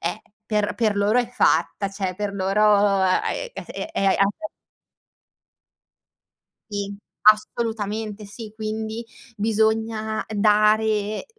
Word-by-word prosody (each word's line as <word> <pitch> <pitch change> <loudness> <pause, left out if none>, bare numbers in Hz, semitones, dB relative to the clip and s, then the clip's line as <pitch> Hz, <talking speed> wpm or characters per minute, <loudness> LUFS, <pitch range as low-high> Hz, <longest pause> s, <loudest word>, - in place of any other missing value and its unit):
è 170 +5 -2 0.3
per 210 -1 0
per 215 -3 +1
loro 205 +4 +3
è 245 -1 0
fatta, 210 -4 +1
cioè 195 -2 -3
per 205 0 -3
loro 200 0 +3
è 325 - 0
es - - -7
è 320 - -4
ape 200 +11 +1 2.2
Sì. 200 0 -3 0.3
Assolutamente, 215 -1 +1
sì. 215 +1 -9
Quindi, 220 +1 -4 0.3
bisogna 220 0 0
dare, 215 - +2
215 Hz, 100 wpm, -23 LUFS, 205-220 Hz, 2.2 s, loro